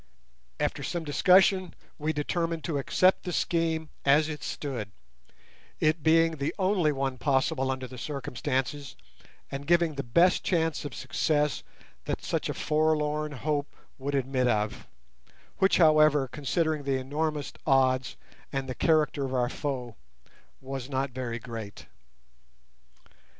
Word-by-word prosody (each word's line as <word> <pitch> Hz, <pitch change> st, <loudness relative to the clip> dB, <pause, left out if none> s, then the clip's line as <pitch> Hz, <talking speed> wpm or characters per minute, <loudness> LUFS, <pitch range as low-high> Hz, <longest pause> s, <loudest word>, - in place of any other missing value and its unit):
After -, -, -1 dB
some 170 Hz, -1 st, -3 dB
discussion 185 Hz, +4 st, +4 dB, 0.2 s
we 155 Hz, +1 st, 0 dB
determined 165 Hz, +2 st, -2 dB
to 150 Hz, -4 st, -1 dB
accept 185 Hz, +7 st, +3 dB
the 180 Hz, -, -5 dB
scheme, 165 Hz, -2 st, 0 dB
as 150 Hz, +3 st, +4 dB
it 150 Hz, -1 st, -5 dB
stood, 125 Hz, -8 st, -4 dB, 0.9 s
it 155 Hz, +1 st, +2 dB
being 165 Hz, +1 st, +4 dB
the 140 Hz, +1 st, -2 dB
only 185 Hz, -5 st, +2 dB
one 135 Hz, -2 st, -2 dB
possible 135 Hz, 0 st, +1 dB
under 130 Hz, -1 st, -2 dB
the 130 Hz, 0 st, -9 dB
circumstances, 140 Hz, 0 st, -3 dB, 0.6 s
and 140 Hz, +1 st, -6 dB
giving 170 Hz, -2 st, +3 dB
the 140 Hz, -, -3 dB
best 170 Hz, +9 st, +3 dB
chance 165 Hz, -4 st, 0 dB
of 145 Hz, -, -6 dB
success 150 Hz, -3 st, 0 dB, 0.4 s
that -, -, -3 dB
such -, -, -2 dB
a -, -, -3 dB
forlorn 150 Hz, -1 st, +1 dB
hope 145 Hz, +1 st, -2 dB, 0.2 s
would 140 Hz, +2 st, -2 dB
admit 130 Hz, -1 st, +1 dB
of—which, 65 Hz, -, -2 dB
however, 155 Hz, -4 st, +5 dB
considering 155 Hz, +3 st, -1 dB
the 135 Hz, -1 st, 0 dB
enormous 150 Hz, +2 st, -2 dB
odds 130 Hz, -2 st, +2 dB, 0.3 s
and 135 Hz, -1 st, -2 dB
the 130 Hz, -, -3 dB
character 155 Hz, -1 st, +2 dB
of 130 Hz, -1 st, -2 dB
our 120 Hz, -1 st, +1 dB
foe, 125 Hz, -6 st, -4 dB, 0.6 s
was 135 Hz, -1 st, -6 dB
not 135 Hz, 0 st, -1 dB
very 120 Hz, -2 st, -4 dB
great. 115 Hz, -3 st, -8 dB
145 Hz, 130 wpm, -28 LUFS, 130-160 Hz, 0.9 s, however